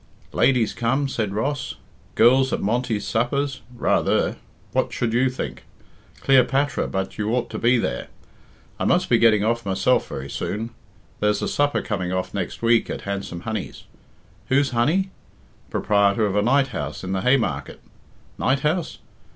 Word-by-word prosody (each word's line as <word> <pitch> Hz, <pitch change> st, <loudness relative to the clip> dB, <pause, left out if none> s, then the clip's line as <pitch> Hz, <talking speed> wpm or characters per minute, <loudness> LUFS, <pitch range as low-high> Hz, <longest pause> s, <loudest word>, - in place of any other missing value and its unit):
"Ladies 125 Hz, -5 st, +3 dB
come?" 130 Hz, +4 st, 0 dB
said 110 Hz, -6 st, -2 dB
Ross. 135 Hz, +8 st, -2 dB, 0.4 s
"Girls 130 Hz, +3 st, +5 dB
at -, -, 0 dB
Monty's 115 Hz, 0 st, -1 dB
suppers? 135 Hz, +4 st, -1 dB
Rather! 120 Hz, -, +1 dB, 0.3 s
what -, -, 0 dB
should 115 Hz, -2 st, -1 dB
you 130 Hz, +2 st, +3 dB
think? 125 Hz, -, -6 dB, 0.6 s
Cleopatra 135 Hz, +1 st, +3 dB
but 95 Hz, +1 st, -4 dB
you 105 Hz, 0 st, -1 dB
ought 120 Hz, -1 st, -2 dB
to -, -, -4 dB
be 120 Hz, +2 st, +4 dB
there. -, -, -2 dB, 0.7 s
I -, -, -1 dB
must -, -, +2 dB
be -, -, +4 dB
getting 110 Hz, -3 st, +5 dB
off 115 Hz, +2 st, 0 dB
myself 95 Hz, +5 st, +1 dB
very 70 Hz, 0 st, -5 dB
soon. 110 Hz, +10 st, -4 dB, 0.5 s
There's 105 Hz, 0 st, +1 dB
a -, -, 0 dB
supper 145 Hz, 0 st, +1 dB
coming 95 Hz, -5 st, -2 dB
off 95 Hz, 0 st, -2 dB
next 100 Hz, +3 st, -4 dB
week 115 Hz, 0 st, +3 dB
at -, -, -4 dB
Handsome 100 Hz, -3 st, -4 dB
Honey's. 110 Hz, -1 st, -5 dB, 0.6 s
Who's 140 Hz, +1 st, +2 dB
Honey? 160 Hz, +12 st, +1 dB, 0.6 s
Proprietor 100 Hz, +1 st, +2 dB
of 100 Hz, -1 st, -1 dB
a 105 Hz, -, +3 dB
night 135 Hz, +5 st, +3 dB
house 75 Hz, -, -5 dB
in 95 Hz, -, -4 dB
the 95 Hz, -1 st, -1 dB
Haymarket. 125 Hz, +2 st, 0 dB, 0.6 s
Night 130 Hz, +1 st, +1 dB
house? 155 Hz, +3 st, -1 dB
115 Hz, 155 wpm, -23 LUFS, 105-130 Hz, 0.7 s, Girls